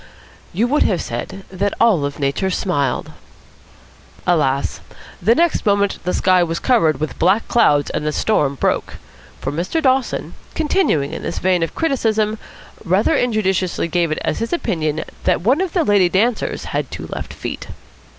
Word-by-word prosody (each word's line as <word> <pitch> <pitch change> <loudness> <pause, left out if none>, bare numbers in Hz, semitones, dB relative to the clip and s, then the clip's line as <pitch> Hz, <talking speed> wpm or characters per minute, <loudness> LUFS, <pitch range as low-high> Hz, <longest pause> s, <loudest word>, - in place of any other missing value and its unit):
You 210 +7 +1
would 290 +5 +1
have - - +2
said 195 - -5
that 195 +1 -1
all 225 -7 +4 0.2
Nature 140 +7 0
smiled. 145 -9 -1 1.1
Alas! 145 -6 +1 0.4
The 225 +6 +4
next 340 +2 +2
moment 200 -1 +1
the 180 - 0
sky 185 -1 +3
was 165 -1 0
covered 165 - +2
with 155 - -4
black 190 +6 +2
clouds 145 -12 +3
and - - -2
the 150 - 0
storm 145 -6 +1
broke. - - -1 0.5
For 135 - -2
Mr. 175 - -1
Dawson, 265 -4 0 0.2
continuing 295 - +1
in - - -5
this - - -4
vein 185 -1 +1
of 165 - -2
criticism, 220 -8 0 0.4
rather 190 +2 +2
injudiciously 190 -7 0
gave 170 -1 +1
it 155 - -1
as - - -1
his 230 - -3
opinion 160 - -1 0.2
that - - +2
one 255 - +2
of 380 -3 -2
the 350 - +2
lady 200 -6 +3
dancers 215 +5 0
had - - -1
two - - -7
left - - -6
feet. - - -6
190 Hz, 160 wpm, -19 LUFS, 165-230 Hz, 1.1 s, all